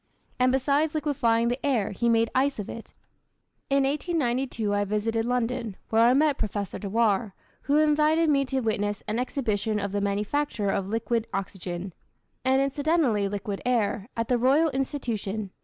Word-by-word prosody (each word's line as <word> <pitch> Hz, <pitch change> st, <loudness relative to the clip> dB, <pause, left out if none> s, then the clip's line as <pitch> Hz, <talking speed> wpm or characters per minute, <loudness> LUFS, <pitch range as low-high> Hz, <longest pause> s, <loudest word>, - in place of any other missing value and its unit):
And 255 Hz, 0 st, +4 dB
besides 285 Hz, +4 st, +1 dB
liquefying 235 Hz, -6 st, +1 dB
the 245 Hz, +2 st, -3 dB
air 250 Hz, -8 st, +1 dB
he 235 Hz, +4 st, 0 dB
made 230 Hz, 0 st, +2 dB
ice 275 Hz, +2 st, +1 dB
of 210 Hz, -, -5 dB
it. 230 Hz, -, -9 dB, 0.7 s
In 275 Hz, 0 st, +3 dB
1892 270 Hz, -, -1 dB
I 205 Hz, 0 st, +1 dB
visited 220 Hz, +2 st, -1 dB
London, 240 Hz, -3 st, -1 dB
where 225 Hz, 0 st, +3 dB
I 240 Hz, +2 st, +5 dB
met 295 Hz, 0 st, +2 dB
Professor 205 Hz, -3 st, -3 dB
Dewar, 210 Hz, -1 st, 0 dB, 0.3 s
who 290 Hz, -, +4 dB
invited 310 Hz, +2 st, +3 dB
me 280 Hz, -2 st, +3 dB
to 265 Hz, 0 st, -1 dB
witness 205 Hz, -3 st, -1 dB
an 215 Hz, +3 st, -1 dB
exhibition 220 Hz, -5 st, -1 dB
of 200 Hz, -1 st, -3 dB
the 205 Hz, 0 st, -1 dB
manufacture 205 Hz, +2 st, -1 dB
of 195 Hz, 0 st, -2 dB
liquid 230 Hz, +1 st, -1 dB
oxygen 185 Hz, -2 st, -5 dB, 0.5 s
and 260 Hz, +1 st, +3 dB
incidentally 275 Hz, -7 st, +1 dB
liquid 200 Hz, 0 st, -4 dB
air 225 Hz, -3 st, 0 dB
at 230 Hz, 0 st, -1 dB
the 250 Hz, -1 st, +1 dB
Royal 285 Hz, +6 st, +3 dB
Institution. 220 Hz, -7 st, -3 dB
235 Hz, 155 wpm, -26 LUFS, 205-275 Hz, 0.7 s, I